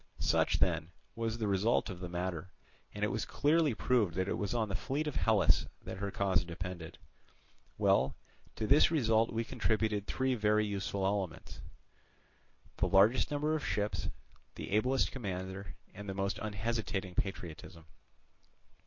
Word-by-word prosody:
"Such, - - +2
then, 80 - +1 0.3
was 115 0 -2
the 110 -2 -1
result 100 +3 +2
of 90 - -8
the 90 -1 -5
matter, 90 -1 -3 0.4
and 105 - -5
it 105 - +2
was - - -1
clearly 150 -3 +2
proved 110 -8 +2
that 95 +1 0
it - - 0
was 100 - -2
on 110 -2 +1
the 100 - -5
fleet 140 +9 -2
of 150 - -3
Hellas 95 -10 +3 0.2
that - - -6
her 100 +1 -2
cause 95 -3 +1
depended. 85 -1 -6 0.8
Well, 65 +1 +3 0.4
to 110 - -2
this 140 +7 +6
result 115 -8 +2
we 115 +1 -1
contributed 110 -2 0
three 130 0 0
very 105 -2 +2
useful 100 -1 -2
elements, 95 -4 -2
viz., - - -11 1.2
the - - +2
largest 100 +6 +5
number 150 +1 0
of 155 - -3
ships, 105 +3 -1 0.5
the - - -6
ablest 125 +6 +2
commander, 95 - -5 0.2
and 100 0 -8
the 95 - -3
most 100 +1 -1
unhesitating 105 -3 -2
patriotism. 85 -3 -5
100 Hz, 155 wpm, -33 LUFS, 95-115 Hz, 1.2 s, this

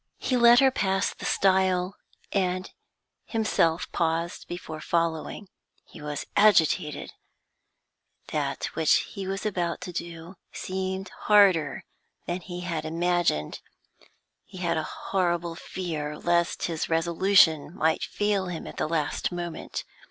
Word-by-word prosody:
He 255 - -1
let 240 0 +7
her 265 -1 +5
pass 190 -5 0
the - - -9
stile, 190 -1 +2 0.4
and 185 -1 -1 0.5
himself 180 -7 +1
paused 165 +1 -1
before 160 -3 -7
following. 165 +4 -1 0.4
He 165 - -13
was 150 -1 -4
agitated; 170 -7 +3 1.2
that - - -2
which 160 -2 +3
he 195 -1 -5
was 195 +2 -3
about 175 -5 -1
to 180 -1 -6
do 170 +1 -7
seemed 190 0 -4 0.2
harder 190 -9 +5 0.4
than 175 +1 -3
he 175 0 -7
had 165 -3 -3
imagined; 170 - 0 0.8
he - - -13
had 170 -2 0
a 160 - 0 0.3
horrible 175 -3 +1
fear 155 -4 -5
lest 170 +1 +1
his 165 -2 -2
resolution 165 -1 +4
might 160 -3 +1
fail 205 -3 0
at 170 -2 -6
the - - 0
last 155 +1 -1
moment. 175 -2 -5
175 Hz, 120 wpm, -27 LUFS, 165-190 Hz, 1.2 s, let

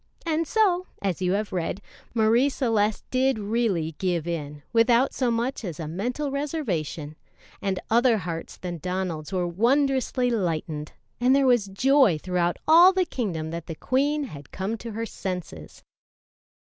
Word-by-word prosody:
And 325 0 0
so, 370 -5 +2
as 190 -3 -2
you 180 0 +1
have 205 0 -2
read, 180 +1 -2 0.4
Marie 230 +5 +4
Celeste 220 -6 0
did 260 -1 +2
really 205 -7 0
give 175 -4 0
in, 150 -4 -5
without 235 +3 +4
so 255 -2 0
much 235 +3 -1
as 175 -6 -5
a 160 - -4
mental 245 - -3
reservation, 195 - -3 0.5
and 190 -2 -1
other 235 0 +4
hearts 165 -3 -5
than 175 -2 -5
Donald's 180 -3 -3
were 180 -2 0
wondrously 255 +5 +1
lightened, 160 -7 -2 0.3
and 250 +2 +4
there 275 -1 +3
was 240 -5 +3
joy 250 - +4
throughout 175 +1 -1
all 340 +4 +8
the 375 -1 +1
kingdom 175 - -3
that 170 -1 -6
the 165 - -5
queen 285 - 0
had 145 - -9
come 195 +4 -3
to 230 -1 -7
her 225 +2 -3
senses. 180 - -6
210 Hz, 155 wpm, -25 LUFS, 170-260 Hz, 0.5 s, all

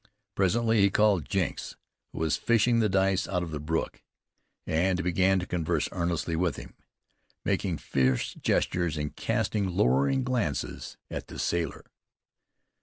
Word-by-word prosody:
Presently 110 +3 +2
he 100 - +5
called 100 -8 +2
Jenks, - - -2 0.4
who - - -12
was 80 -2 +1
fishing 115 +1 +2
the 110 -2 +2
dice 95 0 +2
out 90 - -1
of 85 - -6
the 75 - -4
brook, 80 +2 -2 0.6
and 90 +3 +1
began 95 +2 +3
to 90 - -2
converse 85 -3 -1
earnestly 85 -2 -1
with 85 -3 0
him, - - -10 0.7
making - - 0
fierce 65 -1 0
gestures 85 -4 0
and 75 0 -4
casting 100 -3 0
lowering 70 - +3
glances 120 - -2
at - - -5
the - - -9
sailor. 85 -1 -2
90 Hz, 140 wpm, -28 LUFS, 80-100 Hz, 0.7 s, he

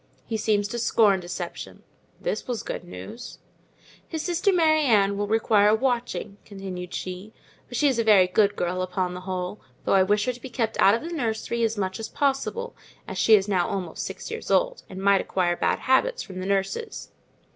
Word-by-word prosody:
He 225 - -3
seems 210 -1 +1
to 240 - -3
scorn 215 -4 +3
deception" 175 0 -7 0.4
(this - - -3
was 245 -3 -3
good - - -5
news). 220 +6 -9 0.7
"His 320 -2 -4
sister 355 +3 +1
Mary 315 -4 +4
Ann 205 -7 +3
will 205 +1 -2
require 215 -1 +4
watching," 240 -4 -2
continued 190 -3 -7
she, 185 +4 -6 0.3
"but 245 - -5
she 290 - +4
is 260 -4 +1
a - - +3
very 205 -4 +6
good 200 +3 +2
girl 180 +1 -1
upon 185 0 -2
the 180 - -6
whole; 185 +1 -4 0.2
though - - +2
I 195 - +6
wish 205 +2 +2
her 250 - 0
to 245 - -14
be 265 - -7
kept 230 -2 -2
out 200 +2 +6
of 235 - -4
the 340 +1 -5
nursery 235 -3 -2
as 225 -1 +1
much 190 0 -2
as 225 - -5
possible, 290 - -1 0.3
as - - -5
she 220 - +7
is 200 -1 +1
now 185 -4 +1
almost 180 -4 -4
six - - -6
years 455 0 -6
old, - - +2
and 190 - -8
might 195 0 +4
acquire 175 -2 0
bad - - +1
habits 470 - +2
from 185 -2 -8
the 185 - -4
nurses. 200 - -2
210 Hz, 200 wpm, -25 LUFS, 190-250 Hz, 0.7 s, she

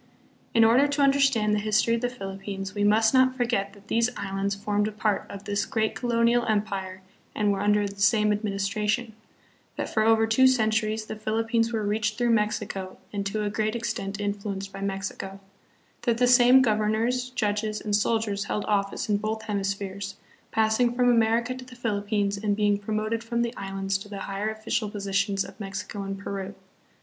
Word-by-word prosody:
In 230 - +6
order 240 +6 +5
to 285 0 +1
understand 275 -6 +3
the 210 - +2
history 215 +2 +2
of 230 - 0
the 245 - 0
Philippines, 195 -3 -6
we 205 - -1
must 220 +3 +4
not 260 0 +4
forget 230 -5 0
that 200 0 -18
these 230 +1 +2
islands 195 0 -2
formed 205 +1 0
a - - -3
part 210 -1 -1
of 200 0 -8
this 205 0 -1
great 220 -2 -1
colonial 235 0 +2
empire 195 -3 -2 0.3
and 210 -1 +2
were 195 - -1
under 205 0 +2
the 200 0 -9
same 210 +1 +4
ad 210 +1 -1
ministration; 210 +3 -1 0.6
that - - -4
for 220 - +2
over 225 0 +4
two 225 +4 +5
centuries 220 -3 +1
the 215 - -6
Philippines 225 +2 0
were 220 -3 -1
reached 210 0 0
through 240 -1 +2
Mexico 210 -3 -1 0.2
and 200 -1 -2
to 210 +2 -2
a 205 - -1
great 215 +1 -1
extent 220 -4 -3
influ 205 0 -3
enced 195 0 -6
by 195 - -7
Mexico; 195 0 -4 0.6
that 235 -2 +1
the 250 - +3
same 250 +1 +7
governors, 225 +3 +1
judges, 215 -2 -1
and 210 -1 -1
soldiers 210 -1 0
held 210 - -2
office 200 -1 -1
in 210 -1 +2
both 220 +1 -3
hemispheres, 200 -1 -3 0.3
passing 220 +2 +2
from 245 0 +4
America 230 +1 +2
to 255 0 -9
the 250 0 -13
Philippines 205 -3 -1
and 205 0 0
being 205 -1 +2
promoted 215 +2 -2
from 235 +1 -1
the 235 +1 -3
Islands 195 0 -2
to 205 +1 -11
the 200 -1 -6
higher 200 +2 -3
official 220 0 -2
positions 200 -1 -1
of - - -13
Mexico 195 0 -5
and 195 0 -4
Peru. 195 0 -5
210 Hz, 185 wpm, -26 LUFS, 200-230 Hz, 0.6 s, same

